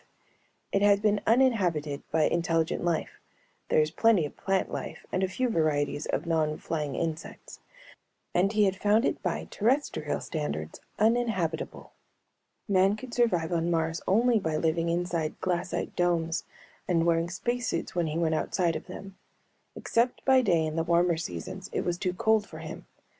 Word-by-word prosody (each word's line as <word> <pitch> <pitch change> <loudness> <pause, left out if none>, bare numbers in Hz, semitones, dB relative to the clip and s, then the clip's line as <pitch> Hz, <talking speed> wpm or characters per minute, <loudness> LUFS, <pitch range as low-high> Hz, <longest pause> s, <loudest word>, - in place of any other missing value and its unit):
It 195 - +1
had 205 0 +4
been 210 -1 +2
uninhabited 185 - +2
by 160 0 +2
intelligent 165 0 +1
life 170 -2 -1 0.5
(there - - +4
is 155 0 0
plenty 210 -3 +3
of 145 - -8
plant 195 0 -1
life - - -6
and 185 - 0
a 190 - +2
few 250 +7 -1
varieties 150 - 0
of - - -2
non 155 -2 0
flying 150 -4 -3
insects) 165 -1 -5 0.7
and 190 +3 +3
he 215 -1 +3
had 190 -1 +2
found 210 +5 +2
it - - -1
by - - -2
terrestrial 230 - 0
standards 80 - -4 0.2
uninhabitable. 215 -8 0 0.8
Man 195 0 +3
could 240 +2 -9
survive 180 -10 +1
on 170 0 0
Mars 165 -1 0
only 230 +4 +4
by 160 -5 -1
living 165 +1 0
inside 170 -2 -1
glassite 180 0 -2
domes 170 -2 0 0.4
and 170 -2 +2
wearing 170 0 +2
space 240 +7 -2
suits 165 - -2
when 175 -2 0
he 155 +1 -2
went 165 -1 +1
outside 170 +1 0
of - - -6
them. 195 +1 -9 0.6
Except 235 +2 0
by 265 -1 +6
day 170 -8 +2
in 155 +1 -3
the 165 - +2
warmer 170 +1 +3
seasons 85 - -6
it - - 0
was 175 0 -2
too 180 -2 -1
cold 220 +2 +2
for - - -10
him. - - -8
175 Hz, 165 wpm, -28 LUFS, 160-205 Hz, 0.8 s, by